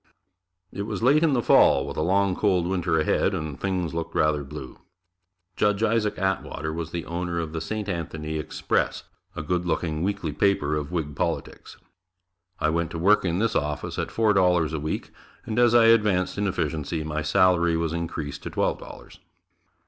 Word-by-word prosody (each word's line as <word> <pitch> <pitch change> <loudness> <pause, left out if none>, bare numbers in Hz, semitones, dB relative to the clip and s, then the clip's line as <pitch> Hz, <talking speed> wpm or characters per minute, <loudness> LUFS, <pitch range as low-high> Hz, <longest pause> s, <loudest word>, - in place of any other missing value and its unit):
It 100 +1 -4
was 110 - -4
late 140 +5 +5
in 160 -4 +3
the 120 -3 +1
fall, - - +5
with - - -6
a - - -1
long 95 +2 +2
cold 95 -4 +1
winter 85 -3 0
ahead 95 +5 +1
and 75 -5 -5
things 90 -4 -1
looked 85 0 -4
rather 75 -1 +2
blue. 70 -2 -9 0.8
Judge 105 +1 +1
Isaac 110 -1 +1
Atwater 95 -4 -2
was 80 -1 -4
the 85 -1 -5
owner 85 0 -3
of 80 -1 -4
"The 80 - -3
St. 105 +4 -4
Anthony 80 -4 -4
Express," 75 - -1 0.3
a - - -4
good 90 +3 -1
looking 80 -1 -1
weekly 95 -4 -2
paper 75 -4 +1
of 75 +1 -4
Whig 75 -5 -3
politics. - - -4 0.8
I 75 - +2
went 85 0 -1
to 85 - -6
work 100 +6 +4
in 85 -2 0
this 115 +3 0
office 75 0 -2
at - - -2
four 110 -2 +2
dollars 90 -4 +3
a 80 - -2
week 75 +2 -4 0.3
and 110 +2 -2
as 120 -1 +5
I 115 -1 +7
advanced 105 -5 +3
in 105 0 -1
efficiency, 80 -3 -2
my 75 0 -3
salary 85 0 +3
was 80 -1 -1
increased 80 -4 -4
to - - -6
twelve - - -1
dollars. - - -12
85 Hz, 185 wpm, -25 LUFS, 80-100 Hz, 0.8 s, I